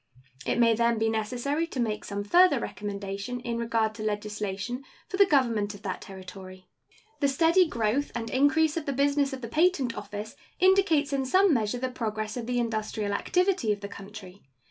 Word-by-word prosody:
It -, -, +1 dB
may 230 Hz, -1 st, +5 dB
then 235 Hz, +1 st, +2 dB
be 225 Hz, 0 st, +1 dB
necessary 245 Hz, +9 st, -1 dB
to 275 Hz, -, -6 dB
make 215 Hz, -3 st, -1 dB
some 205 Hz, 0 st, -4 dB
further 345 Hz, -, +5 dB
recommendation 200 Hz, +3 st, -5 dB
in 235 Hz, -1 st, -3 dB
regard 230 Hz, -2 st, 0 dB
to 220 Hz, -, -7 dB
legislation 210 Hz, +3 st, -3 dB, 0.2 s
for 380 Hz, -, -4 dB
the 400 Hz, -1 st, +6 dB
government 230 Hz, -, +1 dB
of 200 Hz, -, -14 dB
that 185 Hz, -3 st, -4 dB
Territory. 185 Hz, -1 st, -10 dB, 0.5 s
The 280 Hz, -, +3 dB
steady 330 Hz, +6 st, +4 dB
growth 235 Hz, +1 st, 0 dB
and 230 Hz, -1 st, -3 dB
increase 300 Hz, +3 st, +3 dB
of 315 Hz, -, -4 dB
the 280 Hz, -, 0 dB
business 280 Hz, +1 st, +2 dB
of 265 Hz, -1 st, -6 dB
the 230 Hz, -, -5 dB
Patent 280 Hz, -3 st, +2 dB
Office 210 Hz, +1 st, -7 dB, 0.2 s
indicates 360 Hz, -7 st, +3 dB
in 275 Hz, -1 st, +1 dB
some 370 Hz, +6 st, +4 dB
measure 225 Hz, -1 st, 0 dB
the 255 Hz, +1 st, -2 dB
progress 215 Hz, -3 st, -3 dB
of 240 Hz, -2 st, -5 dB
the 250 Hz, 0 st, -1 dB
industrial 215 Hz, -3 st, -2 dB
activity 360 Hz, -, +1 dB
of 205 Hz, -1 st, -2 dB
the 200 Hz, -, -5 dB
country. 200 Hz, -1 st, -11 dB
235 Hz, 185 wpm, -27 LUFS, 210-280 Hz, 0.5 s, the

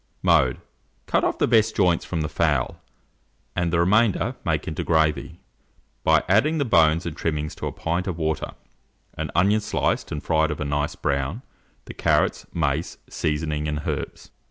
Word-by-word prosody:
Mode. 65 Hz, -1 st, +3 dB, 0.5 s
Cut -, -, +1 dB
off -, -, 0 dB
the -, -, +2 dB
best 110 Hz, -2 st, +3 dB
joints 90 Hz, -4 st, +2 dB
from 85 Hz, -3 st, -2 dB
the 75 Hz, -, -1 dB
fowl, -, -, 0 dB, 0.7 s
and 85 Hz, -2 st, 0 dB
the 85 Hz, -, +2 dB
remainder 100 Hz, +4 st, +2 dB
make -, -, -1 dB
into 80 Hz, -, -3 dB
gravy, 80 Hz, 0 st, 0 dB, 0.6 s
by 80 Hz, -1 st, +4 dB
adding 110 Hz, -, +3 dB
to 150 Hz, -, +1 dB
the 125 Hz, -, -6 dB
bones 80 Hz, +1 st, +4 dB
and 80 Hz, -3 st, -4 dB
trimmings 75 Hz, -2 st, -2 dB
a -, -, -2 dB
pint 85 Hz, +3 st, -2 dB
of 90 Hz, -3 st, -3 dB
water, 80 Hz, -1 st, -2 dB, 0.6 s
an -, -, -4 dB
onion 100 Hz, +4 st, +3 dB
sliced 105 Hz, -, -1 dB
and 75 Hz, -, -4 dB
fried 80 Hz, -1 st, +2 dB
of 75 Hz, -, -4 dB
a 75 Hz, -, -2 dB
nice 75 Hz, +1 st, -1 dB
brown, 70 Hz, -, -2 dB, 0.4 s
the -, -, -8 dB
carrots, -, -, +1 dB
mace, 75 Hz, 0 st, -1 dB
seasoning, 75 Hz, 0 st, -2 dB
and 75 Hz, -1 st, -3 dB
herbs. -, -, -5 dB
80 Hz, 170 wpm, -24 LUFS, 75-90 Hz, 0.7 s, by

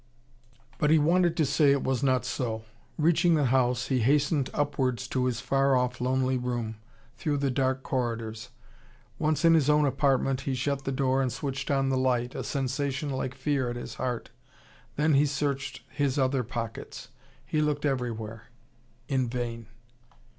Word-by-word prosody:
But 150 Hz, -, +2 dB
he 160 Hz, -, +6 dB
wanted 170 Hz, +2 st, +3 dB
to 160 Hz, -, +3 dB
say 145 Hz, +1 st, +3 dB
it 140 Hz, -1 st, +1 dB
was 130 Hz, -1 st, 0 dB
not 130 Hz, -4 st, +2 dB
so. 110 Hz, -4 st, -3 dB, 0.3 s
Reaching 170 Hz, +2 st, +3 dB
the 150 Hz, -2 st, +2 dB
house, 125 Hz, -1 st, +1 dB
he 130 Hz, -2 st, +2 dB
hastened 140 Hz, +3 st, +2 dB
upwards 130 Hz, -4 st, -1 dB
to 130 Hz, -1 st, 0 dB
his 125 Hz, -2 st, -1 dB
far 135 Hz, +1 st, +2 dB
off, 125 Hz, 0 st, 0 dB
lonely 130 Hz, 0 st, +1 dB
room, 120 Hz, -3 st, -3 dB, 0.4 s
through 150 Hz, -2 st, -1 dB
the 140 Hz, -1 st, 0 dB
dark 130 Hz, +1 st, 0 dB
corridors. 115 Hz, -4 st, -3 dB, 0.7 s
Once 155 Hz, +1 st, +1 dB
in 165 Hz, -, +7 dB
his 150 Hz, -3 st, +3 dB
own 150 Hz, 0 st, +4 dB
apartment, 135 Hz, -1 st, +1 dB
he 135 Hz, -1 st, -2 dB
shut 140 Hz, +1 st, -2 dB
the 135 Hz, -, -1 dB
door 135 Hz, 0 st, +1 dB
and 130 Hz, -2 st, 0 dB
switched 135 Hz, +1 st, -4 dB
on 135 Hz, -1 st, +2 dB
the 130 Hz, -1 st, +1 dB
light, 125 Hz, -1 st, +1 dB
a -, -, -4 dB
sensation 140 Hz, +1 st, -2 dB
like 130 Hz, -1 st, -3 dB
fear 135 Hz, -2 st, 0 dB
at 120 Hz, -, -4 dB
his 120 Hz, -, -6 dB
heart. 125 Hz, -3 st, -3 dB, 0.6 s
Then 150 Hz, +1 st, +2 dB
he 145 Hz, +2 st, +4 dB
searched 140 Hz, 0 st, -2 dB
his 140 Hz, -1 st, 0 dB
other 135 Hz, -1 st, +2 dB
pockets. 115 Hz, -1 st, -6 dB, 0.4 s
He 150 Hz, +4 st, 0 dB
looked 150 Hz, -1 st, 0 dB
everywhere. 115 Hz, -5 st, -3 dB, 0.6 s
In 130 Hz, -3 st, 0 dB
vain. 115 Hz, -2 st, -4 dB
135 Hz, 170 wpm, -28 LUFS, 125-145 Hz, 0.7 s, in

